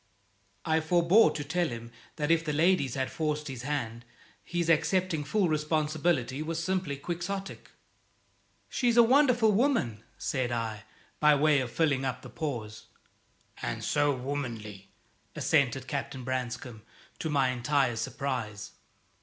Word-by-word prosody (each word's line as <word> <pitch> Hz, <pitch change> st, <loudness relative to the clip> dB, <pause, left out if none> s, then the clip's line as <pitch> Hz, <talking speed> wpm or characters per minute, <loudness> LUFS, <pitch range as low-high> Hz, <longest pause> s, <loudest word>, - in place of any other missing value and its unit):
I 160 Hz, -1 st, +2 dB
forbore 175 Hz, +6 st, +5 dB
to 150 Hz, -, -3 dB
tell 175 Hz, +4 st, 0 dB
him 115 Hz, -2 st, -7 dB, 0.2 s
that 150 Hz, 0 st, 0 dB
if 165 Hz, -1 st, +3 dB
the 150 Hz, -2 st, -2 dB
ladies 155 Hz, -4 st, +2 dB
had 130 Hz, -1 st, -2 dB
forced 150 Hz, -1 st, -2 dB
his 130 Hz, -4 st, -6 dB
hand 120 Hz, -4 st, -3 dB, 0.4 s
his 175 Hz, -1 st, -2 dB
accepting 165 Hz, 0 st, +2 dB
full 185 Hz, +6 st, +1 dB
responsibility 155 Hz, -3 st, 0 dB
was 160 Hz, +1 st, -3 dB
simply 180 Hz, -4 st, -1 dB
quixotic. 175 Hz, +6 st, -5 dB, 1.0 s
"She's 240 Hz, -2 st, +1 dB
a 235 Hz, -, +9 dB
wonderful 245 Hz, -3 st, +4 dB
woman," 200 Hz, -, +1 dB
said 130 Hz, -5 st, -1 dB
I, 110 Hz, -3 st, -3 dB, 0.3 s
by 150 Hz, -1 st, +6 dB
way 150 Hz, 0 st, +4 dB
of 130 Hz, -2 st, -2 dB
filling 145 Hz, -5 st, +1 dB
up 130 Hz, -2 st, -3 dB
the -, -, -10 dB
pause. 110 Hz, -8 st, -5 dB, 0.7 s
"And -, -, -3 dB
so 145 Hz, 0 st, +2 dB
womanly!" 120 Hz, -7 st, -5 dB, 0.5 s
assented 135 Hz, -4 st, +1 dB
Captain 140 Hz, -2 st, -4 dB
Branscome, 120 Hz, -2 st, -4 dB, 0.4 s
to 160 Hz, -, -2 dB
my 140 Hz, -3 st, +2 dB
entire 130 Hz, 0 st, +1 dB
surprise. 115 Hz, -3 st, -4 dB
145 Hz, 135 wpm, -29 LUFS, 125-165 Hz, 1.0 s, a